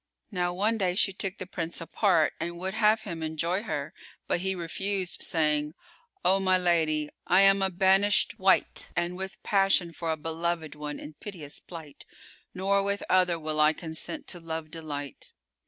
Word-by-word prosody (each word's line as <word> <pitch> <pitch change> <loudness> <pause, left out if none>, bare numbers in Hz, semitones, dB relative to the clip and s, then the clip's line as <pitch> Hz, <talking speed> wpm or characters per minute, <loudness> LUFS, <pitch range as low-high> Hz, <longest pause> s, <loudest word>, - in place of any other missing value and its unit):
Now 180 -2 0
one 210 +5 0
day 180 -2 +1
she 195 0 +2
took 190 0 -4
the 185 - -5
Prince 170 -2 -4
apart 165 -1 +2
and 170 +1 -4
would 190 +2 -3
have 215 0 +3
him 170 -6 -6
enjoy 165 +4 -1
her; 150 -8 -4 0.3
but - - +1
he 190 +1 -1
refused, 185 +2 -3
saying, 150 -1 +1 0.5
"O 195 +1 +5
my 185 -1 +3
lady, 160 -4 +1 0.2
I 185 +2 +6
am 195 0 +6
a 190 - +2
banisht 195 +4 +3
wight 190 0 +3
and 175 +1 -1
with 190 +1 -5
passion 195 -4 +2
for 165 -1 -2
a 160 - -1
beloved 165 +1 -2
one 150 0 -5
in 150 - -9
piteous 165 -9 -7
plight, 160 -5 -10 0.5
nor 195 +2 +2
with 200 +1 -1
other 180 -2 +4
will 155 -1 -3
I 150 +1 +6
consent 160 - -5
to 175 - -2
love 160 -1 -5
delight." 145 -4 -7
175 Hz, 170 wpm, -28 LUFS, 160-195 Hz, 0.5 s, I